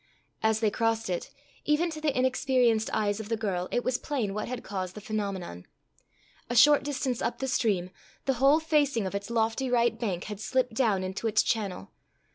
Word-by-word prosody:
As 220 0 +2
they 215 -2 +2
crossed 225 -2 0
it, 175 - -3 0.3
even 315 +3 +1
to 310 -1 -7
the 295 -4 0
inexperienced 255 -3 +2
eyes 210 -1 0
of 220 -1 -7
the 225 - 0
girl 185 -5 -2
it 245 - 0
was 255 0 0
plain 245 -10 -2
what 210 - -3
had 250 -1 -5
caused 185 -2 -4
the - - -6
phenomenon. 195 - -4 0.8
A 240 - -2
short 290 +5 +7
distance 270 -3 -2
up - - -1
the 265 - -3
stream, 195 -8 0 0.3
the 270 - +2
whole 280 +3 +6
facing 290 -8 +1
of 190 - -4
its 200 +1 -4
lofty 230 +3 0
right 240 -1 +2
bank 190 -7 -2
had 210 -2 -6
slipped 250 +3 0
down 220 -6 +1
into 190 +4 -3
its 215 0 +3
channel. 200 - -2
225 Hz, 195 wpm, -28 LUFS, 200-260 Hz, 0.8 s, short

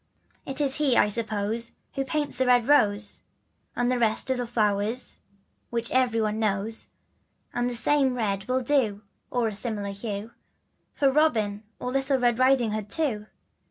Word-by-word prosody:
It 270 +1 -4
is 280 -2 +1
he 280 -5 +3
I - - +5
suppose 220 +1 -2 0.2
who 275 - -1
paints 295 +2 -2
the 260 0 +1
red 245 -2 +4
rose, 210 -8 +2 0.5
And 245 0 +1
the 250 - +1
rest 225 +3 +1
of 260 - +1
the 245 - -2
flowers 215 +1 0 0.5
which 235 0 -2
every 250 -3 +2
one 215 0 0
knows, 215 +1 -1 0.7
And 245 0 0
the 245 - -4
same 265 +2 +3
red 200 -5 -1
will 255 +1 +1
do 235 -6 +1 0.3
(or 245 -2 0
a 215 - -3
similar 205 -1 -2
hue), 205 +1 -5 0.6
For 275 -2 +3
Robin 225 -9 +2 0.2
and 250 - -3
little 270 +1 +1
Red 240 -1 +1
Riding 255 -3 +4
Hood 210 -1 -4
too. 220 -7 -1
235 Hz, 165 wpm, -26 LUFS, 210-260 Hz, 0.7 s, I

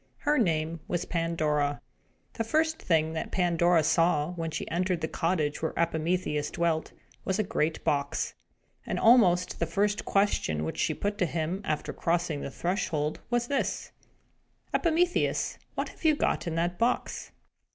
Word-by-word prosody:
Her 295 -1 +2
name 165 -5 0
was 175 +1 -1
Pandora. 155 -4 0 0.5
The 225 - -2
first 315 +7 +1
thing 160 -2 +2
that 160 - -3
Pandora 175 -2 +3
saw, 165 0 +2
when 165 -2 -3
she 160 - -4
entered 180 0 0
the 160 - 0
cottage 160 -4 -1
where 160 - -2
Epimetheus 160 -2 0
dwelt, 165 -2 0 0.3
was 190 - 0
a 215 - +2
great 165 -4 -1
box. 140 -1 0 0.5
And - - -3
almost 180 -7 +5
the 170 - 0
first 205 +3 0
question 195 - +1
which 80 - -4
she 155 - +1
put 205 +5 -2
to 180 - +2
him, 165 +4 -2
after 155 -5 -2
crossing 165 -3 0
the - - -4
threshold, 160 -2 -1
was 240 0 +1
this: 275 +2 -2 0.8
"Epimetheus, 345 +1 +1 0.2
what - - -2
have - - -16
you 315 -1 +5 0.3
in 165 - -2
that 175 +1 -1
box?" 240 +2 -1
170 Hz, 150 wpm, -28 LUFS, 155-195 Hz, 0.8 s, almost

